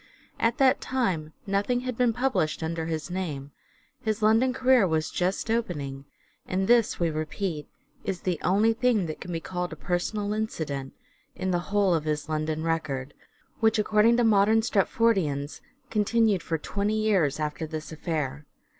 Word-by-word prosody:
At 230 Hz, +1 st, +2 dB
that 265 Hz, -1 st, +4 dB
time 185 Hz, -12 st, -1 dB
nothing 205 Hz, +5 st, 0 dB
had 255 Hz, -1 st, -4 dB
been 245 Hz, 0 st, +3 dB
published 240 Hz, -11 st, 0 dB
under 160 Hz, 0 st, -2 dB
his 160 Hz, +1 st, -3 dB
name, 150 Hz, -7 st, -4 dB, 0.5 s
his 215 Hz, 0 st, -2 dB
London 225 Hz, +4 st, +4 dB
career 255 Hz, -5 st, +4 dB
was 160 Hz, -2 st, 0 dB
just 185 Hz, +5 st, -1 dB
opening, 145 Hz, -12 st, -2 dB, 0.4 s
and 190 Hz, +1 st, 0 dB
this 235 Hz, -2 st, +3 dB
we 170 Hz, -2 st, +1 dB
repeat, 155 Hz, +1 st, -3 dB, 0.4 s
is 190 Hz, -3 st, -3 dB
the 180 Hz, -4 st, -1 dB
only 205 Hz, +6 st, +3 dB
thing 225 Hz, -4 st, +2 dB
that 155 Hz, -2 st, -6 dB
can 180 Hz, -, -6 dB
be 165 Hz, -, -2 dB
called 180 Hz, +1 st, -4 dB
a -, -, -6 dB
personal 205 Hz, +6 st, -2 dB
incident 155 Hz, -11 st, -3 dB, 0.4 s
in 185 Hz, 0 st, -2 dB
the 175 Hz, -, +1 dB
whole 200 Hz, -2 st, +3 dB
of 160 Hz, -2 st, 0 dB
his 150 Hz, 0 st, -2 dB
London 155 Hz, 0 st, -2 dB
record, 150 Hz, -5 st, -2 dB, 0.5 s
which 225 Hz, 0 st, +3 dB
according 215 Hz, +2 st, +4 dB
to 240 Hz, -, +3 dB
modern 220 Hz, 0 st, +4 dB
Stratfordians 190 Hz, -10 st, +1 dB, 0.3 s
continued 215 Hz, -2 st, +2 dB
for 165 Hz, -, -2 dB
twenty 205 Hz, +6 st, -1 dB
years 185 Hz, -10 st, +2 dB
after 155 Hz, +1 st, -3 dB
this 155 Hz, 0 st, -6 dB
affair. 150 Hz, -3 st, -3 dB
185 Hz, 160 wpm, -27 LUFS, 155-220 Hz, 0.5 s, that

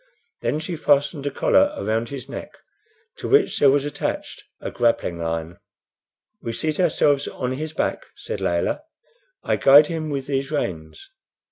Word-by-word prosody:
Then 150 Hz, -, 0 dB
she 165 Hz, +2 st, -4 dB
fastened 145 Hz, -1 st, +1 dB
a -, -, +2 dB
collar 285 Hz, -, +3 dB
around 115 Hz, -, -1 dB
his 135 Hz, -2 st, -7 dB
neck, -, -, -7 dB, 0.6 s
to -, -, -5 dB
which 420 Hz, 0 st, +3 dB
there 140 Hz, -, +6 dB
was 140 Hz, +1 st, +2 dB
attached 145 Hz, -, -4 dB, 0.2 s
a -, -, -5 dB
grappling 115 Hz, -8 st, 0 dB
iron. 80 Hz, +1 st, -3 dB, 0.8 s
"We 115 Hz, -, -4 dB
seat 155 Hz, +6 st, -2 dB
ourselves 145 Hz, -5 st, +2 dB
on 125 Hz, -1 st, -3 dB
his 155 Hz, +4 st, -4 dB
back," -, -, -2 dB
said -, -, -6 dB
Layelah. 85 Hz, -, 0 dB, 0.6 s
"I -, -, +1 dB
guide 145 Hz, +4 st, +7 dB, 0.2 s
with 140 Hz, -2 st, -3 dB
these 135 Hz, -1 st, -2 dB
reins. 95 Hz, -, -4 dB
140 Hz, 150 wpm, -23 LUFS, 115-155 Hz, 0.8 s, guide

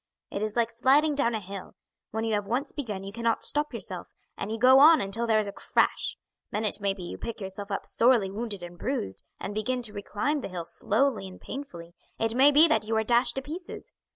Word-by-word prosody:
It 200 Hz, -, -3 dB
is 215 Hz, 0 st, -2 dB
like 235 Hz, -1 st, +1 dB
sliding 280 Hz, +6 st, +4 dB
down 240 Hz, -5 st, +1 dB
a -, -, -1 dB
hill; 195 Hz, -1 st, -9 dB, 0.3 s
when 220 Hz, +1 st, -3 dB
you 225 Hz, -1 st, 0 dB
have 205 Hz, -1 st, -1 dB
once 255 Hz, +6 st, -1 dB
begun 215 Hz, -10 st, -5 dB
you 195 Hz, +1 st, -7 dB
cannot 230 Hz, 0 st, 0 dB
stop 295 Hz, 0 st, 0 dB
yourself, -, -, -6 dB, 0.3 s
and -, -, -5 dB
you 225 Hz, -, -2 dB
go 255 Hz, +3 st, +7 dB
on 315 Hz, +3 st, +8 dB
until 210 Hz, +4 st, -2 dB
there 220 Hz, -1 st, +4 dB
is 215 Hz, -, +1 dB
a 200 Hz, -, -5 dB
crash; -, -, 0 dB, 0.3 s
then 215 Hz, +1 st, -2 dB
it 205 Hz, 0 st, -2 dB
may 200 Hz, -1 st, +2 dB
be 185 Hz, -, -8 dB
you 175 Hz, -, -7 dB
pick 230 Hz, -, -5 dB
yourself 200 Hz, +1 st, -6 dB
up 200 Hz, -, -3 dB
sorely 230 Hz, -5 st, +3 dB
wounded 205 Hz, -3 st, -4 dB
and 175 Hz, 0 st, -9 dB
bruised, 245 Hz, -, -3 dB, 0.2 s
and 205 Hz, -, -5 dB
begin 245 Hz, +4 st, -1 dB
to 215 Hz, -3 st, -4 dB
reclimb 210 Hz, +9 st, -2 dB
the -, -, -4 dB
hill 175 Hz, -2 st, -5 dB
slowly 220 Hz, +3 st, +1 dB
and 185 Hz, -, -12 dB
painfully; 175 Hz, -12 st, -8 dB, 0.2 s
it 225 Hz, 0 st, 0 dB
may 265 Hz, +4 st, +6 dB
be 300 Hz, +3 st, +7 dB
that 220 Hz, -8 st, +1 dB
you 225 Hz, 0 st, +1 dB
are 220 Hz, -, +2 dB
dashed 240 Hz, +2 st, +3 dB
to 270 Hz, -, -3 dB
pieces. 335 Hz, +6 st, -8 dB
225 Hz, 235 wpm, -27 LUFS, 200-260 Hz, 0.3 s, on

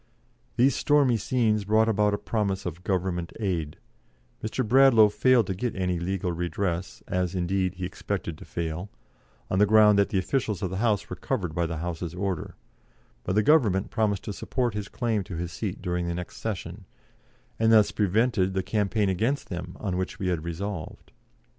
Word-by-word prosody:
These 130 Hz, +2 st, +4 dB
stormy 145 Hz, -4 st, +3 dB
scenes 110 Hz, -1 st, +1 dB
brought 110 Hz, +2 st, +3 dB
about 105 Hz, -1 st, +2 dB
a -, -, -3 dB
promise 100 Hz, -3 st, -2 dB
of 90 Hz, 0 st, -5 dB
Government 90 Hz, -2 st, -1 dB
aid; 85 Hz, -8 st, -2 dB, 0.7 s
Mr. 110 Hz, +2 st, -2 dB
Bradlaugh 120 Hz, -3 st, +6 dB
failed 125 Hz, +1 st, +3 dB
to 95 Hz, -, -2 dB
get 115 Hz, +6 st, -3 dB
any 90 Hz, -2 st, -1 dB
legal 90 Hz, 0 st, -2 dB
redress, 85 Hz, +1 st, -3 dB
as, 90 Hz, 0 st, -1 dB
indeed, 95 Hz, +1 st, 0 dB
he 90 Hz, 0 st, -4 dB
expected 90 Hz, -2 st, -4 dB
to -, -, -9 dB
fail, 85 Hz, +3 st, -4 dB, 0.6 s
on 95 Hz, -, 0 dB
the 105 Hz, -, +5 dB
ground 105 Hz, -1 st, +6 dB
that 100 Hz, -, +3 dB
the -, -, 0 dB
officials 105 Hz, 0 st, -1 dB
of 95 Hz, -, -1 dB
the 95 Hz, -, -3 dB
House 105 Hz, -1 st, +1 dB
were -, -, -6 dB
covered 85 Hz, -4 st, -3 dB
by 85 Hz, +1 st, 0 dB
the 80 Hz, 0 st, -4 dB
House's 85 Hz, +1 st, -4 dB
order, 95 Hz, -3 st, -3 dB, 0.7 s
but 95 Hz, -, -2 dB
the 105 Hz, -, +4 dB
Government 105 Hz, -, +3 dB
promised 105 Hz, -4 st, 0 dB
to 105 Hz, -, -5 dB
support 120 Hz, +2 st, -2 dB
his 105 Hz, -1 st, -4 dB
claim 115 Hz, -5 st, -1 dB
to 95 Hz, -2 st, -7 dB
his 85 Hz, +1 st, -4 dB
seat 70 Hz, -, -5 dB
during 90 Hz, -1 st, -1 dB
the 85 Hz, -, -2 dB
next 90 Hz, 0 st, -7 dB
session, 95 Hz, -2 st, -5 dB, 0.7 s
and 115 Hz, 0 st, +4 dB
thus 110 Hz, -2 st, +6 dB
prevented 100 Hz, -1 st, +1 dB
the 95 Hz, -, 0 dB
campaign 105 Hz, 0 st, 0 dB
against 115 Hz, +10 st, -1 dB
them 90 Hz, 0 st, -6 dB
on 95 Hz, -4 st, -2 dB
which 95 Hz, +1 st, -3 dB
we 95 Hz, -3 st, -2 dB
had 85 Hz, -3 st, -1 dB
resolved. 85 Hz, +1 st, -6 dB
95 Hz, 185 wpm, -26 LUFS, 90-110 Hz, 0.7 s, Bradlaugh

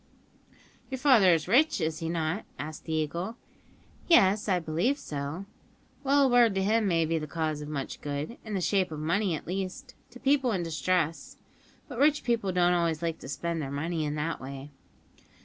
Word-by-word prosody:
"Your 265 Hz, -, -3 dB
father 245 Hz, -9 st, +6 dB
is 165 Hz, -2 st, +1 dB
rich, 270 Hz, +8 st, +4 dB
is 160 Hz, -1 st, -1 dB
he 165 Hz, -1 st, -3 dB
not?" 165 Hz, +3 st, -1 dB
asked 155 Hz, +1 st, -7 dB
the 160 Hz, -, -3 dB
Eagle. 170 Hz, +8 st, -2 dB, 0.7 s
"Yes, 205 Hz, -, +4 dB
I 185 Hz, -, +3 dB
believe 175 Hz, -, 0 dB
so." 145 Hz, -, -5 dB, 0.6 s
"Well, 280 Hz, +1 st, +4 dB
a -, -, +5 dB
word 240 Hz, -4 st, +4 dB
to 190 Hz, -, +1 dB
him 215 Hz, +1 st, +2 dB
may 165 Hz, -3 st, +2 dB
be 165 Hz, +1 st, 0 dB
the 155 Hz, -, -5 dB
cause 155 Hz, -1 st, -2 dB
of 150 Hz, -, -7 dB
much 140 Hz, -3 st, -5 dB
good, 145 Hz, +9 st, -4 dB
in 215 Hz, -2 st, -5 dB
the 190 Hz, -, -1 dB
shape 185 Hz, +1 st, +1 dB
of 155 Hz, -, -5 dB
money 175 Hz, +3 st, 0 dB
at -, -, -8 dB
least, 190 Hz, +8 st, -5 dB, 0.2 s
to 245 Hz, -, -13 dB
people 270 Hz, -3 st, +2 dB
in 180 Hz, -3 st, -1 dB
distress; 165 Hz, +1 st, -1 dB, 0.5 s
but 250 Hz, -4 st, -7 dB
rich 295 Hz, +1 st, +3 dB
people 230 Hz, -5 st, 0 dB
don't 180 Hz, -1 st, +3 dB
always 170 Hz, -2 st, 0 dB
like 165 Hz, -1 st, -2 dB
to -, -, -9 dB
spend 170 Hz, +2 st, -3 dB
their 135 Hz, -, -4 dB
money 160 Hz, +3 st, -2 dB
in 150 Hz, 0 st, -2 dB
that 155 Hz, +2 st, -3 dB
way." 135 Hz, +2 st, -8 dB
175 Hz, 195 wpm, -28 LUFS, 155-215 Hz, 0.7 s, father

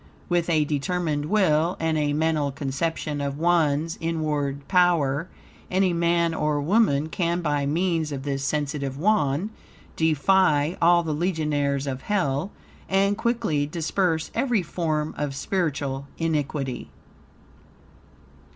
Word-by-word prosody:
With 175 Hz, -1 st, +1 dB
a 155 Hz, -3 st, +3 dB
determined 150 Hz, +1 st, -1 dB
will, 175 Hz, -3 st, +2 dB
and 160 Hz, -1 st, 0 dB
a 150 Hz, -1 st, +1 dB
mental 155 Hz, -2 st, +1 dB
conception 145 Hz, +2 st, -3 dB
of 140 Hz, 0 st, -3 dB
one's 165 Hz, -1 st, +1 dB
inward 150 Hz, -4 st, -2 dB
power, 170 Hz, -4 st, +2 dB, 0.4 s
any 185 Hz, -1 st, +2 dB
man 170 Hz, 0 st, +2 dB
or 150 Hz, -2 st, 0 dB
woman 155 Hz, -3 st, +2 dB
can, 170 Hz, +1 st, -1 dB
by 145 Hz, -2 st, 0 dB
means 165 Hz, 0 st, 0 dB
of 135 Hz, -2 st, -4 dB
this 140 Hz, -1 st, -2 dB
sensitive 140 Hz, -1 st, -2 dB
Wand, 175 Hz, 0 st, +1 dB, 0.4 s
defy 160 Hz, 0 st, +3 dB
all 170 Hz, +1 st, +5 dB
the 160 Hz, -2 st, -2 dB
legionaries 150 Hz, -4 st, 0 dB
of 130 Hz, -2 st, -4 dB
Hell, 175 Hz, -4 st, 0 dB, 0.4 s
and 195 Hz, +1 st, +2 dB
quickly 225 Hz, -11 st, 0 dB
disperse 165 Hz, +1 st, -1 dB
every 235 Hz, -4 st, +1 dB
form 155 Hz, -2 st, -2 dB
of 145 Hz, -2 st, -2 dB
spiritual 140 Hz, -6 st, -2 dB
iniquity. 145 Hz, -5 st, -2 dB
155 Hz, 120 wpm, -25 LUFS, 145-175 Hz, 0.4 s, all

